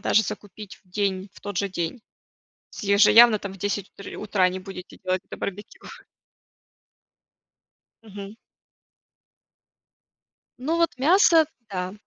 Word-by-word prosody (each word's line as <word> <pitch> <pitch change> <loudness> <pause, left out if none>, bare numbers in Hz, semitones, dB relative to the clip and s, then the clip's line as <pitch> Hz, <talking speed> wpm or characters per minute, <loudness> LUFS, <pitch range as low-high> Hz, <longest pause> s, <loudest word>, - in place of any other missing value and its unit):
даже 220 - +3
закупить 205 -1 -8
в 190 - -31
день, 195 0 -2
в - - -17
тот 205 -3 -4
же 200 - 0
день. 175 +5 -4 0.7
С - - -9
еже 200 +1 +5
явно 230 -2 +8
там 200 -1 -6
в - - -12
10 200 0 -3
утри 200 - -10
утра 200 -3 +1
не 185 +1 -5
будете 185 -1 -10
делать 185 0 0
это - - -9
барбекю. 205 +2 -7 2.2
Мгм. 200 -1 -9 2.2
Ну 295 +6 -1
вот, 335 -1 +2
мясо, 330 +3 +5 0.2
да. 185 -1 -4
200 Hz, 130 wpm, -24 LUFS, 190-215 Hz, 2.2 s, явно